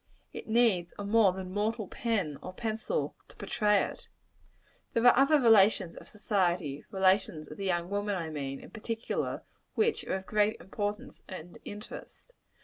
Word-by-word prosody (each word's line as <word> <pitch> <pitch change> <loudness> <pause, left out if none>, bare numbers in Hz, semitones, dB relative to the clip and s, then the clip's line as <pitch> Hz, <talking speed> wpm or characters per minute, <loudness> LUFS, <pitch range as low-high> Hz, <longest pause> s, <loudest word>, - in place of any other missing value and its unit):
It - - -8
needs 220 -7 +2
a 205 - -5
more 210 -1 +5
than 185 0 -6
mortal 210 +1 -1
pen 195 - -2
or 185 - -7
pencil 225 - -2
to - - -17
portray 210 -2 +2
it. - - -7 0.9
There 230 +1 +1
are 245 - +8
other 275 +3 +5
relations 210 -7 +5
of - - -12
society 180 - -1
relations 190 -5 +1
of 150 - -8
the 200 - -4
young 175 -2 0
woman, 205 0 0
I 165 -3 -3
mean, 135 -2 -4
in - - -13
particular 225 +1 -3 0.3
which 445 0 +2
are - - -1
of 190 0 -5
great 210 +1 +1
importance 205 +2 -4
and 175 -2 -9
interest. 210 - -10
205 Hz, 160 wpm, -30 LUFS, 180-225 Hz, 0.9 s, are